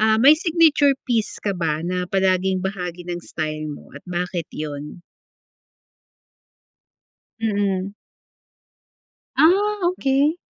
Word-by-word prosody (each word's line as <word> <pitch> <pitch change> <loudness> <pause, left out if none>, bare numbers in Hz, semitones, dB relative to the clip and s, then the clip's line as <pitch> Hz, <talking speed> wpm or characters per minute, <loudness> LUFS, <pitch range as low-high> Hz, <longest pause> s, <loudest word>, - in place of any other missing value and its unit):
ah, 220 0 +4
may 265 +7 +7
signature 310 -4 +3
piece 230 -4 0
ka 200 - +1
ba 165 -3 -2
na 180 0 -2
palaging 190 -1 +1
bahagi 180 -3 -4
ng 175 0 -4
style 155 -2 -4
mo 145 - -10
at 140 - -10
bakit 175 -1 -3
'yon? 150 +2 -7 2.4
Mm. 200 -3 -1 1.4
Ah, 405 +6 +4
okey. 285 0 +1
190 Hz, 105 wpm, -22 LUFS, 175-270 Hz, 2.4 s, may